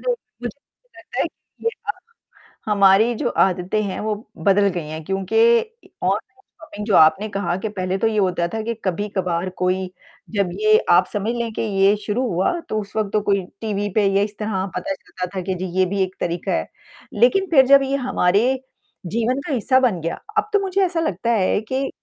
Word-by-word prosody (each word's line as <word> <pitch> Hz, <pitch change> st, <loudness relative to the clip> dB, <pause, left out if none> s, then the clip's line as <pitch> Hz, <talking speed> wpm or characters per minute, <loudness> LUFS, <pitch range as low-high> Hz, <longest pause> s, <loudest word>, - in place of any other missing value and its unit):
बिल्कुल -, -, 0 dB, 0.3 s
मुझे 240 Hz, -, -2 dB
तो -, -, -46 dB
लगता -, -, -9 dB
है -, -, 0 dB
कि -, -, -23 dB
ये 460 Hz, -, +4 dB, 0.2 s
अ -, -, +2 dB, 0.8 s
हमारी 200 Hz, +3 st, +5 dB
जो 240 Hz, +1 st, -1 dB
आदतें 190 Hz, +2 st, +1 dB
हैं, 195 Hz, -2 st, -4 dB
वो 215 Hz, 0 st, -1 dB, 0.3 s
बदल 200 Hz, 0 st, +4 dB
गई 165 Hz, -4 st, -4 dB
हैं 155 Hz, +1 st, -6 dB
क्योंकि 195 Hz, -, -2 dB, 0.5 s
इ -, -, -18 dB, 0.2 s
ऑनलाइन 390 Hz, -, -2 dB, 0.2 s
शॉपिंग 310 Hz, -10 st, -8 dB
जो 210 Hz, -4 st, +2 dB
आपने 160 Hz, +7 st, +5 dB
कहा 195 Hz, -3 st, -2 dB
कि 220 Hz, -, -1 dB
पहले 185 Hz, -2 st, -2 dB
तो 225 Hz, -, +1 dB
ये 220 Hz, -1 st, -1 dB
होता 180 Hz, -3 st, +1 dB
था 220 Hz, -, -2 dB
कि 230 Hz, +2 st, -2 dB
कभी-कभार 185 Hz, -2 st, -1 dB
कोई, 185 Hz, +1 st, 0 dB, 0.5 s
जब 200 Hz, -3 st, +1 dB
ये 215 Hz, 0 st, +6 dB
आप 175 Hz, +1 st, +6 dB
समझ 210 Hz, +3 st, -1 dB
लें 235 Hz, -1 st, -2 dB
कि -, -, -3 dB
ये 200 Hz, -1 st, +3 dB
शुरू 225 Hz, +5 st, 0 dB
हुआ, 185 Hz, 0 st, +1 dB, 0.2 s
तो 215 Hz, -, 0 dB
उस 200 Hz, +1 st, -12 dB
वक़्त 215 Hz, -2 st, -1 dB
तो 215 Hz, -, +2 dB
कोई 200 Hz, -1 st, +1 dB, 0.2 s
टीवी 205 Hz, -2 st, -2 dB
पे 210 Hz, -, +3 dB
या 200 Hz, -, +4 dB
इस 205 Hz, 0 st, -5 dB
तरह 210 Hz, -3 st, -1 dB
पता 295 Hz, -, -2 dB
चलता 185 Hz, -9 st, -7 dB
था 190 Hz, -, -1 dB
कि 190 Hz, +1 st, -2 dB
जी, 185 Hz, +1 st, -4 dB
ये 185 Hz, -, +5 dB
भी 195 Hz, +1 st, -1 dB
एक 185 Hz, 0 st, -5 dB
तरीका 170 Hz, 0 st, -2 dB
है। 80 Hz, -, -1 dB, 0.5 s
लेकिन 250 Hz, -, +3 dB
फिर 270 Hz, -4 st, +7 dB
जब 275 Hz, 0 st, +7 dB
ये 270 Hz, +1 st, -1 dB
हमारे 255 Hz, -1 st, +2 dB, 0.5 s
जीवन 235 Hz, +7 st, 0 dB
का 295 Hz, -, -1 dB
हिस्सा 260 Hz, +2 st, +3 dB
बन 240 Hz, -9 st, +1 dB
गया, 165 Hz, -, -3 dB, 0.2 s
अब 425 Hz, -, +1 dB
तो 410 Hz, -, +5 dB
मुझे 390 Hz, 0 st, 0 dB
ऐसा 345 Hz, -2 st, -1 dB
लगता 235 Hz, -, -1 dB
है 205 Hz, -2 st, +2 dB
कि 270 Hz, +1 st, 0 dB
205 Hz, 210 wpm, -21 LUFS, 185-240 Hz, 0.8 s, फिर